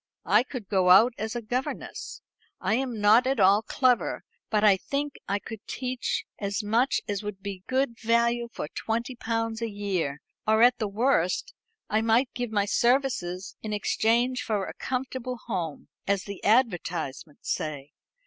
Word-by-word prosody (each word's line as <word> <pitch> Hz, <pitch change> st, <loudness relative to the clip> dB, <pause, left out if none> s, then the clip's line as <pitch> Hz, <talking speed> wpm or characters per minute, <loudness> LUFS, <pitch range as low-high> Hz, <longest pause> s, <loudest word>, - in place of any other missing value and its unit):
I 205 Hz, +5 st, +5 dB
could 250 Hz, -4 st, -7 dB
go 190 Hz, -3 st, +2 dB
out 220 Hz, +7 st, +7 dB
as 220 Hz, +2 st, -3 dB
a 240 Hz, -, -3 dB
governess. 250 Hz, -, -4 dB, 0.4 s
I -, -, 0 dB
am 245 Hz, -2 st, -1 dB
not 220 Hz, +5 st, +5 dB
at 265 Hz, -2 st, +1 dB
all 200 Hz, +2 st, +6 dB
clever, 250 Hz, +2 st, +1 dB, 0.3 s
but 210 Hz, -1 st, +1 dB
I 205 Hz, -2 st, +7 dB
think 280 Hz, +7 st, -3 dB
I 200 Hz, -, +1 dB
could 215 Hz, +1 st, -8 dB
teach 255 Hz, -1 st, -2 dB
as 200 Hz, +1 st, -2 dB
much 230 Hz, +6 st, +2 dB
as 205 Hz, -1 st, -2 dB
would 205 Hz, -2 st, -7 dB
be 200 Hz, -2 st, -5 dB
good 255 Hz, -3 st, 0 dB
value 235 Hz, +1 st, +2 dB
for -, -, -5 dB
twenty 235 Hz, -, -3 dB
pounds 225 Hz, -1 st, -2 dB
a 230 Hz, -, -1 dB
year; 190 Hz, -9 st, -2 dB, 0.3 s
or 220 Hz, +1 st, +5 dB
at 245 Hz, 0 st, +5 dB
the 215 Hz, -, 0 dB
worst 210 Hz, -, +1 dB, 0.3 s
I 215 Hz, +1 st, +1 dB
might 230 Hz, +3 st, +2 dB
give 245 Hz, -2 st, -3 dB
my 205 Hz, -2 st, +1 dB
services 215 Hz, -6 st, 0 dB
in 215 Hz, -1 st, -4 dB
exchange 235 Hz, +4 st, +1 dB
for 210 Hz, -4 st, -1 dB
a -, -, -7 dB
comfortable 255 Hz, -1 st, -4 dB
home, 175 Hz, -9 st, -4 dB, 0.2 s
as 200 Hz, -2 st, +1 dB
the 200 Hz, -2 st, -8 dB
advertisements 175 Hz, -, 0 dB
say. 145 Hz, -2 st, -3 dB
220 Hz, 165 wpm, -27 LUFS, 200-245 Hz, 0.4 s, out